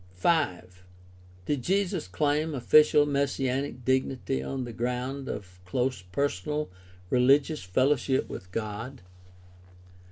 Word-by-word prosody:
5. 90 - 0 0.6
Did 145 +4 -1
Jesus 190 - 0
claim 150 - 0
official 150 +3 +5
messianic 140 -2 -1
dignity 130 0 0
on 135 -1 -3
the 120 -1 -7
ground 125 +3 -3
of 90 -3 -7
close 125 +4 -1
personal 140 +8 -2 0.4
rehgious 135 +4 +3
fellowship 130 +7 +1
with 90 - -8
God 115 +4 -5
130 Hz, 100 wpm, -28 LUFS, 115-145 Hz, 0.6 s, official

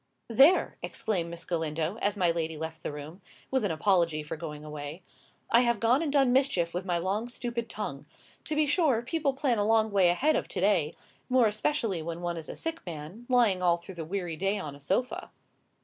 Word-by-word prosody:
"There!" 275 +10 +5
exclaimed 180 -7 -2
Miss 170 0 -8
Galindo, 160 +2 -2
as 205 0 0
my 180 -3 +3
lady 165 -1 -2
left 160 +1 -6
the - - -4
room, 150 +6 -9 0.3
with 265 -3 +1
an 205 - +1
apology 165 -2 +2
for 150 - -5
going 155 -2 -7
away; 150 +3 -7 0.5
"I 235 - +7
have 235 -3 +2
gone 240 +6 +3
and 315 -3 -1
done 270 -3 +4
mischief 255 -11 +2
with 180 +2 -3
my 175 -2 0
long, 200 +7 -1
stupid 240 -2 -4
tongue. 145 -9 -5 0.4
To 310 - -2
be 305 0 +3
sure, 285 -6 +2
people 285 +2 0
plan 265 -5 +1
a - - +2
long 220 0 +3
way 190 -3 +4
ahead 290 - +2
of - - -1
to - - -4
day; 180 -6 +2 0.4
more 255 -2 +5
especially 215 - 0
when 170 +1 -5
one 175 -1 -2
is 160 - -7
a - - -6
sick 325 0 -4
man, 170 +8 -8
lying 230 -7 +4
all 175 -1 +3
through 175 +3 -11
the 170 -2 -5
weary 175 0 -3
day 195 +3 0
on 150 -7 -5
a - - -14
sofa." 195 - -1
190 Hz, 210 wpm, -29 LUFS, 165-240 Hz, 0.5 s, I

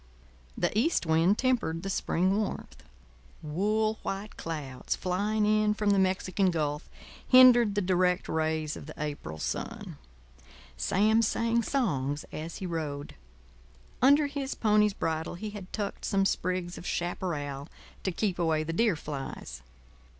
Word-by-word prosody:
The - - 0
east 245 - +2
wind 165 +5 +3
tempered 235 -11 0
the 195 - -3
spring 185 +1 +1
warmth; 210 -1 -4 0.6
wool 215 +8 0
white 200 +2 -5
clouds 150 -6 -4
flying 205 +4 0
in 215 0 +3
from 210 -1 +1
the 200 - +3
Mexican 185 0 +1
Gulf 150 -3 -2 0.4
hindered 245 -4 +7
the 205 - +1
direct 180 0 +2
rays 155 -1 -1
of - - -9
the 155 - -9
April 145 - -5
sun. 75 - -5 0.8
Sam 215 - +3
sang 230 +1 +1
songs 150 - -1
as 160 +2 -6
he 190 - -5
rode. 150 -5 -4 0.9
Under 285 +4 +6
his 285 -1 -3
pony's 210 -2 +3
bridle 160 +1 -2
he 210 +4 -6
had 200 -3 -9
tucked 205 -2 -4
some 195 -1 +1
sprigs 180 -2 -1
of - - -8
chaparral 150 -5 -3 0.3
to 190 - -1
keep 185 0 -1
away 160 -2 +1
the 165 +1 -4
deer 215 +1 +2
flies. 145 - -6
185 Hz, 140 wpm, -29 LUFS, 160-215 Hz, 0.9 s, hindered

